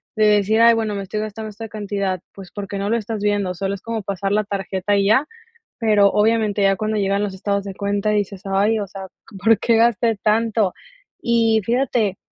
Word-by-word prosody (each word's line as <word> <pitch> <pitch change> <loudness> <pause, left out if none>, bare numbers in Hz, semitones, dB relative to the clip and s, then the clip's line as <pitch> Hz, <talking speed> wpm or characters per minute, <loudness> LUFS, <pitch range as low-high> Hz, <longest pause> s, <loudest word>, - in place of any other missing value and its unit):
de 215 -1 +3
decir, 210 +1 +3
ay, 230 0 +7
bueno 220 -2 -1
me 200 - -3
estoy 210 +2 -4
gastando 215 0 -6
esta 225 +2 -8
cantidad, 200 -3 -3
pues, 195 -2 -11
porque 200 -1 -6
no 200 +1 -2
lo 230 - +2
estás 220 -1 -4
viendo 205 -3 0
solo 195 +2 -2
es 200 - -7
como 230 -2 -4
pasar 195 0 -3
la 210 +1 +2
tarjeta 195 0 -2
y 200 0 +2
ya, 225 +8 +4 0.5
pero 210 -3 +4
obviamente 210 0 +1
ya 195 0 +3
cuando 215 +2 -2
llegan 200 0 0
los 205 -2 -3
estados 200 +1 -2
de 195 -1 -6
cuenta 200 +1 -1
dices, 205 -2 -1
ay, 200 +3 +2
o 205 - -3
sea, 195 0 -9 0.4
¿por 225 -2 +5
qué 230 +1 +2
gasté 230 0 +2
tanto?, 220 -2 +1 0.5
y 230 -2 +3
fíjate, 235 -5 0
205 Hz, 205 wpm, -20 LUFS, 195-220 Hz, 0.5 s, ay